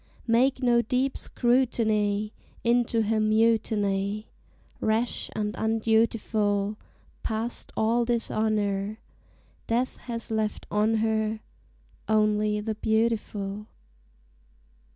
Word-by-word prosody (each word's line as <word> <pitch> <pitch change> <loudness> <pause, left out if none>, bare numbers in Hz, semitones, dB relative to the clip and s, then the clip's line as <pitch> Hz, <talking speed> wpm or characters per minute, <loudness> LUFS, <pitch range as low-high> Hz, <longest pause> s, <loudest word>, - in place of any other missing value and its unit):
Make 255 +3 +2
no 240 -1 +4
deep 255 +4 0
scrutiny 215 -4 +1 0.3
Into 235 -1 +2
her 215 +1 +1
mutiny, 215 -2 +1 0.5
Rash 220 +2 0
and 210 -1 -1
undutiful; 220 -2 +1 0.5
Past 225 +2 -3
all 230 +2 +2
dishonor, 215 -3 0 0.7
Death 245 +3 0
has 230 -2 -6
left 215 -1 -1
on 210 +2 +2
her 220 0 0 0.7
Only 215 -1 +2
the 220 +1 -2
beautiful. 215 -2 -1
220 Hz, 85 wpm, -27 LUFS, 210-230 Hz, 0.7 s, no